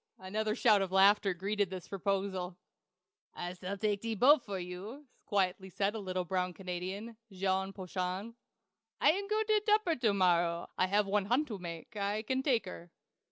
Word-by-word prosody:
Another 215 +3 -2
shout 215 -5 +4
of 190 -1 -2
laughter 195 +1 +5
greeted 200 +2 -1
this 185 -2 -7
proposal. 190 -2 -2 0.8
"I 175 0 -4
s'all 185 +2 -5
take 205 -1 0
ze 225 -1 -2
boat 270 +6 +6
for 200 -4 -4
you!" 185 +10 -7 0.2
quietly 190 -1 0
said 200 +2 0
a 220 - -4
little 185 -2 -3
brown 180 0 -1
Canadian 190 +5 -5
Jean 190 0 0
Poiton. 185 +3 -4 0.7
"I - - +6
am 400 +4 -3
go 430 +1 +1
to 430 -1 +2
Tupper 420 -6 +3
to 235 -4 +2
morrow. 175 -2 +2
I 185 - +2
have 205 +2 +2
one 200 0 +1
hunt 255 +8 +1
to 210 -4 -5
make. 170 +4 -8
I 205 +1 -1
can 260 +4 0
take 255 -6 +1
her." 175 -1 -9
195 Hz, 175 wpm, -32 LUFS, 185-220 Hz, 0.8 s, boat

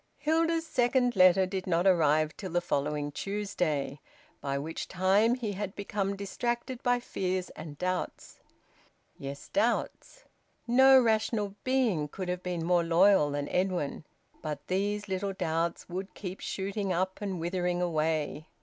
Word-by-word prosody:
Hilda's 325 +1 +1
second 245 -3 +2
letter 185 0 +6
did 190 0 -4
not 175 0 +2
arrive 155 -4 +3
till 190 - -6
the 175 - +3
following 150 -3 -1
Tuesday, 175 -7 -2 0.4
by 140 0 -2
which 155 +4 -4
time 195 +6 +3
he 235 -5 -3
had 195 0 -4
become 200 -1 -2
distracted 240 +5 -3
by 245 0 +2
fears 185 -6 -3
and 155 -2 -9
doubts. 185 +2 -3 0.8
Yes, 140 +1 -7
doubts! - - -1 0.4
No 265 +2 +7
rational 220 -3 +1
being 240 - +1
could 180 +4 -6
have 180 0 -2
been 175 -3 -3
more 175 0 +3
loyal 170 -1 +5
than 145 0 -2
Edwin, 180 -5 -1 0.4
but 150 -2 -5
these 205 +2 -1
little 195 +1 -2
doubts 165 -1 -2
would 190 +2 -6
keep 185 -1 -6
shooting 195 0 -3
up 185 +2 -1
and 195 -3 -3
withering 175 +1 -1
away. 155 -3 -1
185 Hz, 140 wpm, -29 LUFS, 165-205 Hz, 0.8 s, No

